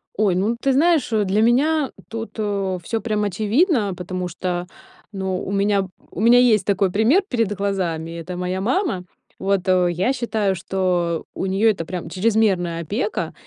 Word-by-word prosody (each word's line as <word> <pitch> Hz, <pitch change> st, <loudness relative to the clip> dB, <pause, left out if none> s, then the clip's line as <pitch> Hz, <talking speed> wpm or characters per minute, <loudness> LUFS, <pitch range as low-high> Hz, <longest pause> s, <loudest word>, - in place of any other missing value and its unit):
Ой, 200 Hz, -3 st, +2 dB
ну 210 Hz, +6 st, +1 dB
ты 270 Hz, -1 st, +1 dB
знаешь, 320 Hz, 0 st, +3 dB
для 210 Hz, -1 st, +1 dB
меня 275 Hz, +5 st, +2 dB, 0.2 s
тут, 225 Hz, 0 st, -5 dB
э, 195 Hz, -3 st, -1 dB
всё 225 Hz, +6 st, -2 dB
прям 215 Hz, -2 st, -1 dB
очевидно, 215 Hz, -, +1 dB
потому 180 Hz, 0 st, -4 dB
что, 180 Hz, 0 st, -3 dB, 0.4 s
ну, 190 Hz, -2 st, -3 dB
у -, -, -5 dB
меня 200 Hz, -1 st, +1 dB, 0.2 s
у 190 Hz, -, -5 dB
меня 240 Hz, +2 st, +6 dB
есть 220 Hz, -6 st, +4 dB
такой 195 Hz, -2 st, +1 dB
пример 225 Hz, -, +4 dB
перед 230 Hz, -5 st, 0 dB
глазами- 180 Hz, -5 st, -2 dB
это 180 Hz, +2 st, -6 dB
моя 180 Hz, +1 st, -2 dB
мама. 250 Hz, -, 0 dB, 0.4 s
Вот, 195 Hz, -1 st, 0 dB
э, 180 Hz, -1 st, +3 dB
я 185 Hz, +10 st, 0 dB
считаю, 220 Hz, -6 st, -1 dB
что 175 Hz, -2 st, -1 dB
у -, -, -2 dB
неё 195 Hz, +4 st, +3 dB
это 195 Hz, -6 st, -1 dB
прям 175 Hz, -2 st, -5 dB
чрезмерная 185 Hz, -3 st, +1 dB
опека, 205 Hz, -, -2 dB
200 Hz, 165 wpm, -21 LUFS, 185-225 Hz, 0.4 s, меня